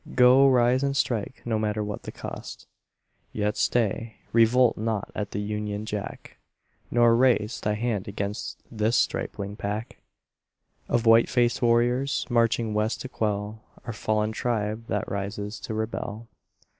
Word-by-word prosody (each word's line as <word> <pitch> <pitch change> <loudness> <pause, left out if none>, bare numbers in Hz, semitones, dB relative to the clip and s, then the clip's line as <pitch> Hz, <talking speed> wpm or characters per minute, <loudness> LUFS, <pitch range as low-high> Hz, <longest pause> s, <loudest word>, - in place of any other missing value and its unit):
Go; 130 +2 +7
rise 125 0 +3
and 140 0 0
strike, 120 -1 -1
no 115 -2 0
matter 105 0 -1
what 105 0 -5
the - - -7
cost. - - -8 0.7
Yet 105 0 -1
stay. 115 -1 0 0.2
Revolt 115 +1 +5
not 110 -2 -2
at 105 -1 -3
the - - -5
Union 105 0 -3
Jack, 105 -2 -6 0.5
Nor 120 -1 +4
raise 120 -1 +2
Thy 105 0 0
hand 110 -3 -2
against 100 +1 -4
this 110 +1 +1
stripling 100 +1 -2
pack 105 +3 -4 0.9
Of 120 -1 +1
white 115 +1 +6
faced 120 -1 +2
warriors, 120 +3 +2
marching 115 -2 +2
West 105 +2 0
to 130 - -6
quell 105 -2 -2 0.2
Our 120 - -4
fallen 110 +1 0
tribe 110 -1 -2
that 105 - -2
rises 100 +1 -4
to 110 - -5
rebel. 110 0 -4
110 Hz, 145 wpm, -26 LUFS, 105-120 Hz, 0.9 s, Go